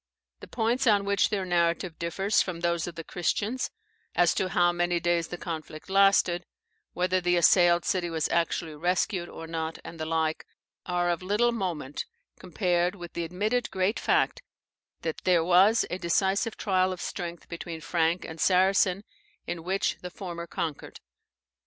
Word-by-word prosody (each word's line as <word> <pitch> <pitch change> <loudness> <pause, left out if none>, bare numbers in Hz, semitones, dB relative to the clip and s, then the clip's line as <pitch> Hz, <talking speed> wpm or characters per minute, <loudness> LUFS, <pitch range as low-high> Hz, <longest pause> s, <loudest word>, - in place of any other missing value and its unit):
The - - -11
points 240 +3 0
on 205 -2 +4
which 200 -1 +2
their 200 -3 -1
narrative 170 -1 0
differs 190 +5 +1
from 170 -3 -4
those 170 -1 0
of 175 - -7
the 165 - -6
Christians, 205 +9 -1 0.5
as 175 -1 +4
to 185 - -1
how 175 -1 +3
many 175 0 0
days 170 -1 +1
the 175 - -6
conflict 160 0 -7
lasted, 195 -3 +4 0.5
whether 185 +1 +1
the 175 0 +2
assailed 175 0 +5
city 180 -3 0
was 160 -2 -1
actually 165 -1 0
rescued 175 +3 -1
or 165 - -8
not, 160 0 -4
and 165 - -10
the 155 - -3
like, 160 -1 0 0.4
are 175 0 +1
of 170 - -2
little 210 +6 +2
moment 175 - -3 0.3
compared 180 -1 0
with 175 -3 -9
the 170 - -2
admitted 210 +8 -1
great 190 +3 0
fact - - +1 0.6
that 160 -2 -3
there 175 -3 +3
was 185 +6 +5
a 180 - -3
decisive 190 +5 +1
trial 185 -2 +1
of 185 - -5
strength 175 -2 -5
between 170 -1 -6
Frank 165 +1 0
and 160 -1 -7
Saracen, 190 +1 +3 0.4
in 170 -2 -5
which 190 +3 0
the 180 - -6
former 170 -2 -7
conquered. 165 -4 -5
175 Hz, 165 wpm, -27 LUFS, 170-190 Hz, 0.6 s, assailed